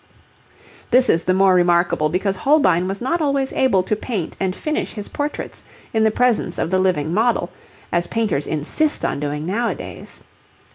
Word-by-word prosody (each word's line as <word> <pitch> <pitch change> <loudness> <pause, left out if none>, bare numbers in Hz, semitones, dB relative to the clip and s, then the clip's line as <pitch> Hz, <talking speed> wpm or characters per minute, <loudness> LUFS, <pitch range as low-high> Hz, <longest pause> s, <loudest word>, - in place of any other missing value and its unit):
This 255 +1 +4
is 165 - 0
the 185 - +2
more 190 0 +4
remarkable 175 -3 +2
because 190 +4 -1
Holbein 185 - +3
was 195 +1 -4
not 335 +7 0
always 275 -2 0
able 220 -9 +2
to 215 - 0
paint 210 -6 -4
and 190 -1 -1
finish 305 0 -3
his 210 -2 -7
portraits 290 +1 -5 0.3
in 220 -1 +2
the 220 - +4
presence 225 -6 +1
of 165 - -2
the 185 - +2
living 175 -4 0
model, 220 -3 +1 0.4
as 175 0 0
painters 215 -11 -1
insist 160 - 0
on - - -1
doing 150 +1 -3
nowadays. 230 +7 -4
195 Hz, 170 wpm, -20 LUFS, 175-245 Hz, 0.4 s, This